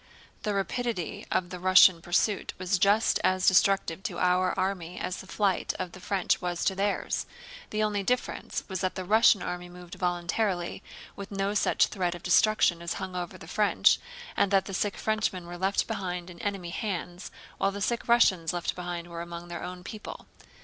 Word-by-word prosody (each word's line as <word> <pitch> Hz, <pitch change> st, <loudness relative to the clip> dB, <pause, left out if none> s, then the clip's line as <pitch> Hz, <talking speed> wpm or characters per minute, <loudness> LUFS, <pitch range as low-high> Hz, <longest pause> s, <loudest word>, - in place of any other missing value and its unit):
The 210 Hz, -1 st, -1 dB
rapidity 200 Hz, -3 st, -2 dB
of 175 Hz, -1 st, 0 dB
the 180 Hz, -, -6 dB
Russian 185 Hz, -1 st, +6 dB
pursuit 190 Hz, +4 st, 0 dB
was 185 Hz, +1 st, 0 dB
just 205 Hz, +4 st, +3 dB
as 185 Hz, 0 st, +2 dB
destructive 190 Hz, -2 st, +3 dB
to -, -, -4 dB
our 180 Hz, 0 st, +2 dB
army 180 Hz, -2 st, -2 dB
as 180 Hz, 0 st, -3 dB
the 190 Hz, -, -10 dB
flight 195 Hz, -1 st, 0 dB
of 185 Hz, -2 st, -4 dB
the 190 Hz, -, -11 dB
French 190 Hz, 0 st, 0 dB
was 175 Hz, -1 st, -2 dB
to 195 Hz, -, +2 dB
theirs. 200 Hz, +1 st, -1 dB, 0.4 s
The 215 Hz, 0 st, 0 dB
only 210 Hz, -1 st, 0 dB
difference 250 Hz, +5 st, -2 dB
was 190 Hz, -2 st, -4 dB
that 185 Hz, -1 st, -1 dB
the 185 Hz, -, -4 dB
Russian 215 Hz, 0 st, +5 dB
army 180 Hz, 0 st, -5 dB
moved 180 Hz, 0 st, -12 dB
voluntarily, 175 Hz, +1 st, -1 dB, 0.3 s
with 200 Hz, 0 st, -8 dB
no 195 Hz, 0 st, -1 dB
such 210 Hz, -, +3 dB
threat 180 Hz, -3 st, -2 dB
of 175 Hz, -, -11 dB
destruction 180 Hz, -2 st, +3 dB
as 170 Hz, -, -3 dB
hung 185 Hz, -1 st, -6 dB
over 175 Hz, -1 st, -4 dB
the -, -, -12 dB
French, 210 Hz, +3 st, +3 dB, 0.4 s
and 200 Hz, -, +2 dB
that 195 Hz, -1 st, +3 dB
the 195 Hz, -, -7 dB
sick 200 Hz, +1 st, -1 dB
Frenchmen 215 Hz, -5 st, -1 dB
were 175 Hz, 0 st, -8 dB
left 190 Hz, +2 st, +1 dB
behind 180 Hz, -4 st, -4 dB
in 170 Hz, -, -13 dB
enemy 195 Hz, -4 st, -3 dB
hands 180 Hz, -2 st, -4 dB, 0.3 s
while 195 Hz, -, +2 dB
the 200 Hz, -, -6 dB
sick 235 Hz, +4 st, -1 dB
Russians 190 Hz, -9 st, +4 dB
left 175 Hz, -1 st, -2 dB
behind 175 Hz, -1 st, -5 dB
were 170 Hz, -1 st, -6 dB
among 170 Hz, 0 st, -8 dB
their 170 Hz, -, -5 dB
own 180 Hz, 0 st, -7 dB
people. 215 Hz, +2 st, -8 dB
185 Hz, 190 wpm, -28 LUFS, 175-200 Hz, 0.4 s, Russian